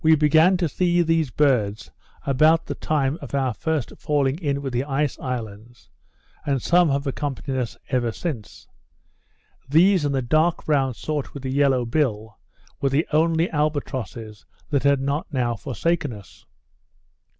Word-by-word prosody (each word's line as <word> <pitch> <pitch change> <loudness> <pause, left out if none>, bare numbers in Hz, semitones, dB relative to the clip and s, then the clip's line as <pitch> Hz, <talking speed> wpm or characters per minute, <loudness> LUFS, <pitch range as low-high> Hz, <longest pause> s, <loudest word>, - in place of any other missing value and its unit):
We 160 0 +6
began 155 +5 +4
to 175 -2 0
see 175 +3 +1
these 165 -3 +1
birds 115 -7 +1 0.3
about 155 +4 +3
the - - -4
time 145 -1 -1
of - - -6
our 130 -3 0
first 160 -1 -2
falling 145 0 0
in 140 -4 -2
with 135 -2 -4
the 120 +2 0
ice 140 0 -1
islands; 120 -2 -7 0.5
and 140 -2 0
some 175 +5 +3
have 140 +1 0
accompanied 135 -1 -3
us 120 -3 -4
ever 120 -3 0
since. 125 - -6 1.0
These, 175 +4 +4
and 145 -1 0
the 130 - 0
dark 155 +7 +1
brown 135 -5 +1
sort 150 +5 -4
with 140 -1 -7
a 130 - -2
yellow 135 -3 +2
bill, 110 -5 -1 0.4
were 135 - +2
the 140 +5 +1
only 165 +2 +3
albatrosses 130 -8 -3 0.3
that 140 -2 +2
had 140 -1 +3
not 145 +6 -2
now 120 -4 0
forsaken 145 +4 -2
us. 100 -5 -14
140 Hz, 155 wpm, -23 LUFS, 125-155 Hz, 1.0 s, We